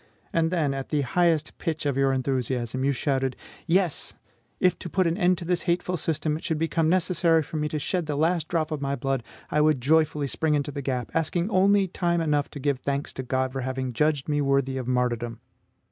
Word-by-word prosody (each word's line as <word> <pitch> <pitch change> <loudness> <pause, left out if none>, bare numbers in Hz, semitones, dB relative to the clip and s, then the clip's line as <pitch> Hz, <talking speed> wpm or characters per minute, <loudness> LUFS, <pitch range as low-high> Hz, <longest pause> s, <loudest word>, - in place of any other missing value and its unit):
And 165 -1 +2
then, 160 -6 +1
at 135 -1 -5
the 150 -2 +1
highest 160 +2 +1
pitch 160 -3 -2
of 140 -2 +1
your 135 0 +3
enthusiasm, 130 -1 -1
you 140 - +3
shouted: 135 -1 0 0.3
"Yes, 175 -2 +1 0.4
if 180 - +2
to 175 - -6
put 185 +2 +1
an 165 0 +1
end 180 -2 +3
to 170 - -7
this 180 0 0
hateful 180 +1 +1
system, 155 -2 -1
it 160 - -7
should 160 - -1
become 165 0 +1
necessary 170 -2 +3
for 155 - -6
me 150 0 -1
to 155 - -2
shed 170 +3 -2
the 150 - -1
last 160 +2 +1
drop 160 -2 -1
of 155 -2 -3
my 140 0 -1
blood, 135 -2 -1 0.3
I 150 - +3
would 150 -3 +3
joyfully 150 +2 +2
spring 150 +2 0
into 145 0 -1
the 140 0 -5
gap, 125 -3 -3
asking 170 +4 0
only 195 +1 +4
time 170 -1 0
enough 150 -3 +1
to 145 - -8
give 140 -1 0
thanks 140 +1 -2
to - - -4
God 130 0 -1
for 135 0 -4
having 130 0 -3
judged 150 +2 +1
me 145 -1 +1
worthy 135 -1 +1
of 130 -2 -4
martyrdom!" 120 -2 -1
150 Hz, 220 wpm, -26 LUFS, 135-165 Hz, 0.4 s, only